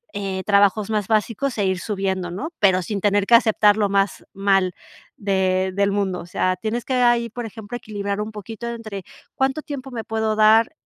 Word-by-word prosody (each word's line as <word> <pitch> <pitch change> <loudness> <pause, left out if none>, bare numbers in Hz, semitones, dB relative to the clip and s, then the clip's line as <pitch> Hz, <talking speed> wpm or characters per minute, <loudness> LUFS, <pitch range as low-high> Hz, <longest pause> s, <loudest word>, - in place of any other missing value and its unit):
eh, 195 -2 -3
trabajos 200 0 +3
más 210 -3 -1
básicos 230 +4 0
e 205 - +1
ir 190 -1 0
subiendo, 190 -2 -2
¿no? 200 - -5
Pero 190 -2 +4
sin 205 +2 -3
tener 205 0 +2
que 235 - +1
aceptar 215 -3 +4
lo 210 -2 +2
más 195 0 0
mal 195 -2 +2 0.4
de 190 -2 0
del 200 0 +1
mundo. 195 -2 -1
O - - -8
sea, 185 +1 -1
tienes 225 +5 -3
que 260 - -1
ahí, 240 -1 +3
por 240 +1 -6
ejemplo, 220 +1 -7
equilibrar 205 -3 -4
un 215 +1 -5
poquito 220 +3 -7
entre 215 -4 -6 0.3
cuánto 265 +3 0
tiempo 275 -2 -6
me 230 -2 -5
puedo 220 -1 -1
dar, 220 +5 +5
205 Hz, 195 wpm, -22 LUFS, 195-225 Hz, 0.4 s, dar